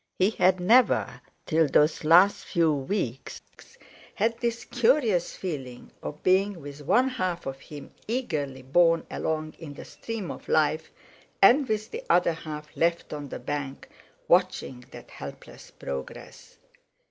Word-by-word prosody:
He 190 +3 +3
had 185 -3 +3
never, 235 +8 +3 0.2
till 160 0 +2
those 150 +2 +2
last 175 +6 +5
few 165 -4 +2
weeks, 135 - -3 0.8
had 225 +3 +1
this 235 -1 -2
curious 235 - +2
feeling 135 -9 -6
of 150 - -7
being 190 0 +2
with 145 0 -9
one 245 - +3
half 185 -9 -3
of 135 0 -5
him 145 0 -11 0.2
eagerly 145 - -3
borne 165 +4 +3
along 155 -1 -3
in 150 -3 -9
the - - -10
stream 225 -6 -6
of - - -10
life, 155 0 +1 0.5
and 255 +8 +6
with 215 0 -2
the 465 +3 -6
other 175 -1 +4
half 150 -2 -8
left 170 -1 0
on 145 -2 -6
the - - -5
bank, 140 -2 -5 0.4
watching 125 -1 +1
that - - -12
helpless - - -10
progress. 70 -1 -8
165 Hz, 140 wpm, -26 LUFS, 145-205 Hz, 0.8 s, and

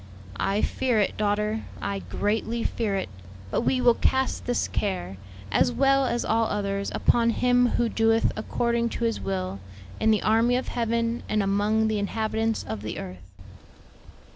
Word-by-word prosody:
"I 200 +2 0
fear 250 -4 +1
it, 200 - +1
daughter, 210 +1 0 0.2
I 200 0 -3
greatly 225 +4 -2
fear 215 -4 -1
it; 195 - -2 0.4
but - - +1
we 255 +2 +1
will 245 -1 +5
cast 265 +2 0
this 245 - 0
care, 95 - -3 0.3
as 100 - +3
well 275 +1 +3
as 240 - -1
all 225 +1 +2
others, 200 -1 -2
upon 235 -1 +3
Him 245 +1 +3
who 240 - +2
'doeth 225 0 +2
according 235 +2 0
to - - -4
His 115 -3 0
will, 95 0 -3 0.4
in 220 - +2
the 215 -1 +3
army 230 +3 +3
of 255 - -2
heaven 230 0 -1
and 215 -1 +1
among 205 +3 +1
the 215 -1 0
inhabitants 220 +2 -1
of 110 -2 -5
the 110 0 -5
earth.'" 90 0 -9
220 Hz, 165 wpm, -26 LUFS, 200-235 Hz, 0.4 s, will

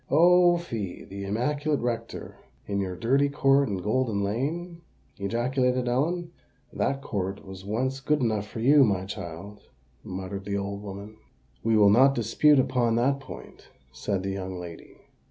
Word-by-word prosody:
"Oh! 175 +3 +6
fie—the 100 - -6
immaculate 145 +8 0
rector 115 -1 -4 0.3
in 100 -1 -2
your 95 -2 -2
dirty 135 +8 +2
court 140 -2 +3
in 100 - -2
Golden 105 +1 0
Lane!" 165 - -3 0.4
ejaculated 125 +4 0
Ellen. 165 +8 0 0.4
"That 135 0 -1
court 100 -4 -3
was 95 -1 -9
once 130 +7 -2
good 150 +2 +1
enough 110 -5 0
for 110 - -7
you, 140 +4 +6
my 95 -5 +1
child," 95 +2 -8 0.4
muttered 95 +1 -6
the 100 0 -2
old 100 0 -4
woman. 100 +1 -8 0.5
"We 115 -1 +3
will 100 -1 +6
not 135 +5 +5
dispute 130 +6 +4
upon 120 -3 +2
that 135 +4 +2
point," 130 - -12 0.2
said 95 +9 -3
the 95 - -2
young 95 -1 -5
lady. 85 -2 -10
115 Hz, 150 wpm, -27 LUFS, 100-135 Hz, 0.5 s, Oh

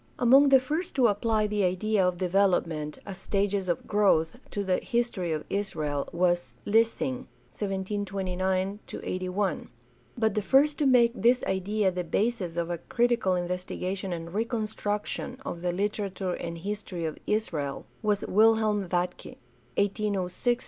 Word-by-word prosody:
Among 270 +4 +6
the 270 -1 +7
first 310 +7 -3
to 260 -3 +4
apply 215 0 +2
the 210 -1 0
idea 190 +3 +1
of 180 -1 +1
development, 175 -5 +1
as 195 -1 -7
stages 200 -1 0
of 175 - -1
growth, 190 -6 +2
to 205 - -3
the 185 -2 +1
history 235 -8 -1
of 155 -1 -2
Israel 155 -8 -2
was 175 0 0
Lessing 220 - +1 0.3
(1729 190 -1 -2
81); 185 +1 -2 0.5
but 220 -3 +2
the 210 - 0
first 285 +7 +3
to 290 - +3
make 240 -3 +5
this 245 +1 +3
idea 190 +1 0
the 180 0 -3
basis 185 -1 -1
of 170 0 -1
a 170 - -3
critical 235 -4 +1
investigation 180 +1 -3
and 170 0 -5
reconstruction 220 +1 -2
of 170 - -5
the 180 0 0
literature 195 -1 -2
and 170 -1 -5
his 205 +5 -4
tory 175 -5 -5
of 155 - -4
Israel 160 -10 -1 0.2
was 210 -2 0
Wilhelm 215 -2 +3
Vatke 180 0 -2 0.4
(1806 200 -1 -1
82). 240 - +6
195 Hz, 145 wpm, -28 LUFS, 180-215 Hz, 0.5 s, the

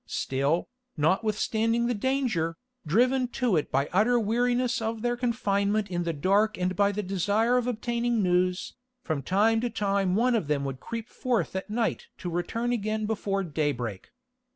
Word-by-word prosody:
Still, 140 +5 0 0.3
notwithstanding 220 +7 +1
the 245 - +1
danger, 220 -9 0 0.3
driven 250 - +3
to 245 -7 +2
it 155 - -1
by 140 +2 +1
utter 230 +6 +4
weariness 240 +2 +1
of 225 0 -3
their 240 0 +1
confinement 210 -4 0
in 175 -1 -1
the 170 - 0
dark 200 +8 +2
and 185 +1 -1
by 200 +2 +3
the 210 +1 -3
desire 205 +6 +1
of 250 -1 +1
obtaining 235 -1 0
news, 180 0 +1 0.3
from 155 -4 -2
time 215 - +2
to 245 - -1
time 200 -4 0
one 245 +4 +3
of 210 -10 0
them 145 -2 0
would 135 -1 -4
creep 230 - -6
forth 245 -6 -1
at 190 +2 -4
night 225 +1 -1
to 175 - -5
return 225 +8 -1
again 215 -2 -1
before 200 -2 -1
daybreak. 140 - -3
210 Hz, 165 wpm, -27 LUFS, 180-235 Hz, 0.3 s, utter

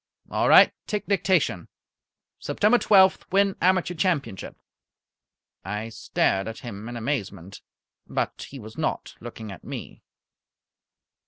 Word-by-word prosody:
"All - - +1
right, - - +8
take 210 -2 -2
dictation. 175 - +1 0.7
September 220 +4 +2
twelfth 190 -2 +5
win 195 0 +3
Amateur 185 0 +2
Championship." 155 - -2 1.1
I 105 +4 -4
stared 95 -3 0
at 115 - -7
him 110 -1 -7
in 120 - -6
amazement, 100 - -4 0.5
but - - -3
he 140 - -9
was 110 +2 -10
not 155 - -2
looking 110 -2 -8
at 100 - -11
me. - - -8
120 Hz, 115 wpm, -25 LUFS, -, 1.1 s, right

